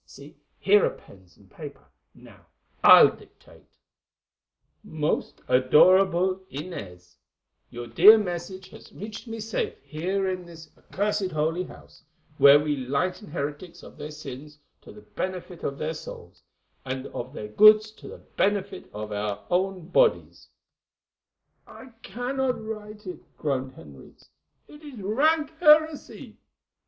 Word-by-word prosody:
See, - - -15 0.2
here 420 +2 +4
are - - +3
pens - - -19
and - - -22
paper. - - -11 0.3
Now - - -18 0.4
I'll - - +8
dictate: - - -20 1.2
"'Most 155 -7 -3
Adorable 185 +8 +4
Inez, 100 - -9 0.5
"'Your 120 0 -8
dear 205 - +7
message 185 -1 -5
has - - -15
reached 210 +4 -9
me 225 0 -6
safely 220 0 -4
here 190 +5 -2
in 185 -1 -3
this 160 -2 -13
accursed 205 -1 -2
Holy 165 +2 -1
House, - - -16 0.4
where 140 +1 +8
we 150 -1 -2
lighten 140 - -3
heretics 160 +3 -6
of - - -14
their 150 +1 -6
sins 150 0 -10 0.2
to - - -14
the 105 - -14
benefit 180 - -6
of 140 - -3
their 155 +3 -3
souls, 155 - -11 0.4
and 130 0 -5
of 125 +2 -7
their 105 -7 -8
goods 215 - +6
to 220 - -14
the - - -10
benefit 200 -1 -2
of 105 0 -7
our 105 0 -4
own 185 -1 -1
bodies——'" - - +1 1.2
"I 260 - -13
cannot 250 +4 -3
write 215 -1 -8
it," 180 - -7 0.2
groaned 130 -3 -3
Henriques; 75 - -16 0.4
"it 295 - -15
is 290 -7 -11
rank 300 +11 +1
heresy." 310 -2 +2
180 Hz, 130 wpm, -25 LUFS, 145-210 Hz, 1.2 s, I'll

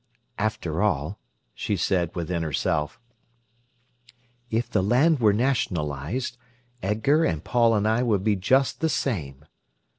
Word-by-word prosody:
"After - - -1
all," - - 0 0.3
she 105 - -2
said 85 -1 0
within 85 0 -2
herself, 75 +2 -1 1.5
"if 115 +1 0
the 110 -5 +1
land 130 - +3
were 110 -3 +5
nationalised, 100 - -1 0.4
Edgar 110 - +2
and 80 - -1
Paul 115 -2 +3
and 105 0 +1
I 110 +2 +2
would 105 -6 +1
be 105 -1 +2
just 130 +8 +2
the 160 - +2
same." 75 - -3
105 Hz, 125 wpm, -25 LUFS, 85-125 Hz, 1.5 s, were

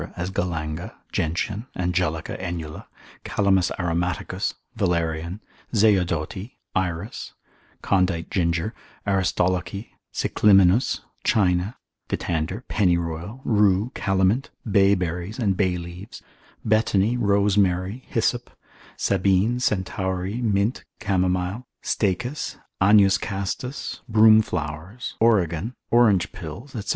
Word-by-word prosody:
as 90 +2 -3
galanga, 85 -3 -3 0.2
gentian, 100 +8 -2
angelica, 90 -3 -1
enula, 85 -4 -5 0.4
calamus 95 -2 +2
aromaticus, 90 -1 -1 0.2
valerian, 85 -2 -1 0.4
zeodoti, 95 -1 +1 0.2
iris, 95 +2 -3 0.5
condite 90 -3 +1
ginger, 85 +3 0 0.3
aristolochy, 95 0 0 0.2
cicliminus, 100 +2 +4 0.2
China, 95 +1 +2 0.3
dittander, 85 +7 -2
pennyroyal, 85 +3 0
rue, 105 +1 +3
calamint, 95 +6 +1 0.2
bay 100 0 +5
berries, 90 +2 -3
and 105 -6 +1
bay 90 -2 +1
leaves, 90 +6 -9 0.5
betony, 110 0 +3
rosemary, 100 0 +2
hyssop, 120 +1 0 0.5
sabine, 100 +5 +2
centaury, 95 0 -1
mint, 105 +1 +1 0.2
camomile, 95 +3 0 0.2
staechas, 120 +8 -1 0.2
agnus 100 0 +6
castus, 100 +7 -4
broom 110 0 +7
flowers, 90 +5 -5
origan, 105 -1 +2 0.2
orange 110 -7 +4
pills, 95 - -8
&c. 105 -4 -5
95 Hz, 90 wpm, -24 LUFS, 90-105 Hz, 0.5 s, broom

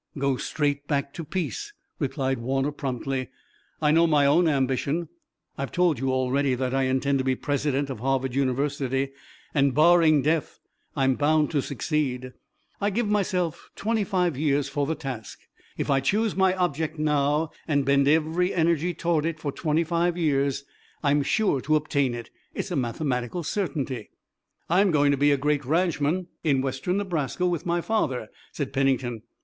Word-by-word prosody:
"Go 140 -1 +1
straight 145 +1 -2
back 140 -2 -1
to 165 - -6
peace," 300 - -4 0.3
replied 135 -2 -1
Warner 135 +4 0
promptly. 135 -2 -3 0.5
"I 150 - +4
know 165 +2 +5
my 150 -3 +4
own 165 +5 +4
ambition. 140 +3 0 0.5
I've 140 - -3
told 175 -7 +2
you 135 0 0
already 130 +1 +1
that 130 0 -2
I 135 0 +2
intend 130 +1 +1
to - - 0
be 130 0 +1
president 140 0 -1
of 130 - -6
Harvard 130 0 0
University, 135 0 0 0.4
and, 140 -2 +2
barring 155 -2 +5
death, 155 -1 0 0.4
I'm 135 -1 +3
bound 150 +2 +2
to 145 -3 +1
succeed. 130 -2 -2 0.5
I 205 - +2
give 215 +2 -1
myself 185 -5 -1
twenty 220 0 0
five 180 -6 0
years 145 0 +1
for 140 0 -1
the 160 - -1
task. 135 -7 -6 0.4
If - - -1
I 135 - +4
choose 210 - +1
my 190 -1 +3
object 160 -3 -1
now 150 +1 +1 0.2
and 145 -3 +1
bend 140 0 +3
every 160 +4 +2
energy 170 0 +1
toward 170 -3 0
it 160 -1 -2
for 145 -2 -3
twenty 155 +2 0
five 170 +1 0
years 140 -4 +1 0.4
I'm 145 0 +3
sure 145 -2 +1
to 155 +4 +2
obtain 140 -4 +1
it. 120 -1 -8 0.2
It's - - -4
a - - -1
mathematical 125 +3 -2
certainty." 145 - -3 0.6
"I'm 190 +4 +4
going 145 -3 +3
to - - +3
be 145 +2 +4
a 140 - +3
great 145 +1 0
ranchman 165 +3 +1 0.2
in 140 -4 +2
Western 135 +8 -1
Nebraska 180 -4 -1
with 175 -2 -1
my 170 0 +1
father," 130 - -1 0.2
said 140 -3 -4
Pennington. 130 -4 0
145 Hz, 165 wpm, -25 LUFS, 135-165 Hz, 0.6 s, know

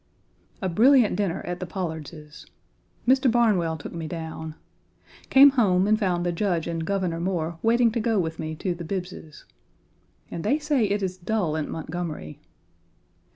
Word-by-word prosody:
A - - +1
brilliant 230 +4 +4
dinner 190 -3 -1
at 175 0 -5
the 180 - -5
Pollards's. 160 -3 -7 0.6
Mr. 260 +1 +4
Barnwell 215 -9 +2
1 - - -5
took 145 - -9
me 165 -2 -5
down. 160 -1 -6 0.7
Came 275 +1 +8
home 195 -8 +3
and 215 +1 +3
found 180 -4 0
the 175 - +1
Judge 175 -2 -1
and 165 -1 -3
Governor 180 -2 -1
Moore 170 -2 -2
waiting 230 +1 +3
to 230 - -1
go 225 -1 +1
with 165 -3 -2
me 155 0 -4
to 180 +3 -2
the 170 0 -8
Bibbs's. 180 -3 -6 0.9
And 165 - -5
they 285 - +2
say 295 -6 +1
it 205 0 -1
is 185 -1 -3
dull 180 -3 -1
in 155 -2 -3
Montgomery! 160 - -5
180 Hz, 165 wpm, -25 LUFS, 165-215 Hz, 0.9 s, Came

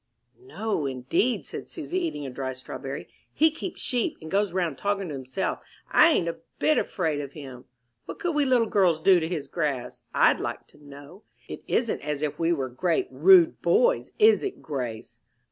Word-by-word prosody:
"No, 220 - -3
indeed," 130 - 0
said - - -7
Susy, 345 +3 -3
eating 325 - -3
a 135 - -5
dry 130 0 -4
strawberry. 135 +2 -7 0.2
"He 315 +1 +3
keeps 330 +3 -7
sheep, 245 -2 -1
and 160 - -10
goes 200 0 +1
round 170 -6 -2
talking 200 -3 -1
to - - -5
himself. 135 +8 -3 0.3
I 320 - +7
ain't 180 - +2
a 170 - -4 0.2
bit 310 - +3
afraid 160 -6 -1
of 140 -1 -8
him. 130 -5 -10 0.4
What - - -7
could 350 -4 -2
we 295 -1 +2
little 250 -4 +3
girls 185 -7 +2
do 185 +2 +5
to 160 - -2
his 160 -5 -4
grass, 150 -7 -3
I'd - - +4
like - - -4
to 150 - -21
know? 145 +6 -13 0.3
It - - -7
isn't 235 -3 0
as 150 0 -3
if 150 -1 -3
we 165 0 +2
were 140 -6 0
great, 175 - -1
rude 360 -4 +5
boys, - - +2
is 440 0 +5
it, 395 -1 -4
Grace?" 125 -7 -6
170 Hz, 190 wpm, -26 LUFS, -, 0.4 s, I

